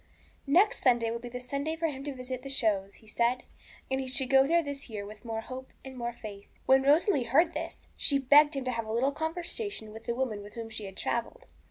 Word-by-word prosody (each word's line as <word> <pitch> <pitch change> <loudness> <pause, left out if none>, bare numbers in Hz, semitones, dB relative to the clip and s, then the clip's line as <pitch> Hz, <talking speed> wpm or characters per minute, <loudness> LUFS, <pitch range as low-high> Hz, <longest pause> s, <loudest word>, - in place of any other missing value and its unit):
Next 360 +10 +4
Sunday 240 -3 +3
would 235 0 -4
be 245 - -7
the 250 +1 -5
Sunday 280 +5 -3
for 330 0 -2
him 275 -4 -2
to 290 - -2
visit 255 0 -5
the 275 - -7
shows, 205 -7 0
he 220 - -19
said, 235 +3 +1 0.5
and 265 0 +1
he 260 - -5
should 255 +1 0
go 270 0 +6
there 335 +2 +3
this 285 -3 -5
year 210 -2 -5
with 210 +1 -11
more 225 -1 -3
hope 260 +3 -8 0.2
and 265 0 -8
more 240 -1 -3
faith. 205 -3 -9 0.2
When 265 0 +6
Rosalie 290 - +4
heard 320 +8 +3
this, 330 +2 -6
she 280 - +3
begged 290 +3 +6
him 270 -1 -3
to 255 - 0
have 230 -2 -3
a - - -4
little 250 +5 +2
conversation 320 - -4
with 225 +1 -10
the 235 - -1
woman 240 -5 -2
with 205 +2 -12
whom 225 -1 -6
she 215 -1 -5
had 195 -1 -9
travelled. - - -2
255 Hz, 240 wpm, -30 LUFS, 230-285 Hz, 0.5 s, go